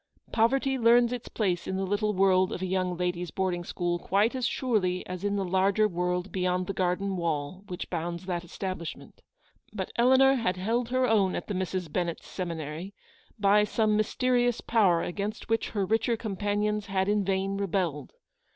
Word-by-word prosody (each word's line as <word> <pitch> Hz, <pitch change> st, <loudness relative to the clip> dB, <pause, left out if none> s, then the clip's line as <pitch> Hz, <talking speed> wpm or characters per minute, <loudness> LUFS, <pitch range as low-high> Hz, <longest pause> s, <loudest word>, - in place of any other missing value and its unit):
Poverty 265 Hz, +4 st, +2 dB
learns 235 Hz, +1 st, +5 dB
its 245 Hz, -1 st, -6 dB
place 180 Hz, -6 st, -1 dB
in 190 Hz, -, -2 dB
the 195 Hz, -, -1 dB
little 205 Hz, +2 st, 0 dB
world 185 Hz, -1 st, +3 dB
of 185 Hz, -, -4 dB
a -, -, +1 dB
young 185 Hz, -1 st, -1 dB
ladies' 180 Hz, -1 st, -2 dB
boarding 180 Hz, 0 st, -1 dB
school 175 Hz, 0 st, -2 dB
quite 205 Hz, +6 st, +2 dB
as 255 Hz, -1 st, 0 dB
surely 195 Hz, -8 st, 0 dB
as 180 Hz, +1 st, -6 dB
in 205 Hz, 0 st, 0 dB
the 195 Hz, -1 st, -1 dB
larger 195 Hz, +3 st, +3 dB
world 180 Hz, 0 st, -2 dB
beyond 180 Hz, -1 st, 0 dB
the 195 Hz, -, -3 dB
garden 190 Hz, +1 st, -1 dB
wall 165 Hz, +2 st, -2 dB
which 180 Hz, -2 st, -5 dB
bounds 170 Hz, +1 st, -3 dB
that 175 Hz, -2 st, -2 dB
establishment. 175 Hz, -1 st, -6 dB, 0.5 s
But 190 Hz, -3 st, -4 dB
Eleanor 260 Hz, +3 st, +6 dB
had 225 Hz, -8 st, 0 dB
held 230 Hz, +5 st, -1 dB
her 255 Hz, +1 st, +2 dB
own 205 Hz, -5 st, +2 dB
at -, -, -4 dB
the 205 Hz, -, -4 dB
Misses 185 Hz, -1 st, -2 dB
Ben 175 Hz, +3 st, -1 dB
nett's 170 Hz, -, -6 dB
seminary, 170 Hz, +1 st, -5 dB, 0.4 s
by 205 Hz, 0 st, +4 dB
some 215 Hz, 0 st, +1 dB
mysterious 245 Hz, +2 st, +1 dB
power 195 Hz, -7 st, +3 dB
against 200 Hz, +5 st, -4 dB
which 225 Hz, 0 st, 0 dB
her 200 Hz, -3 st, -1 dB
richer 225 Hz, +3 st, +1 dB
companions 210 Hz, 0 st, -1 dB
had 190 Hz, -1 st, 0 dB
in 205 Hz, 0 st, +2 dB
vain 195 Hz, +1 st, -1 dB
rebelled. 180 Hz, -6 st, -2 dB
195 Hz, 180 wpm, -28 LUFS, 180-215 Hz, 0.5 s, Eleanor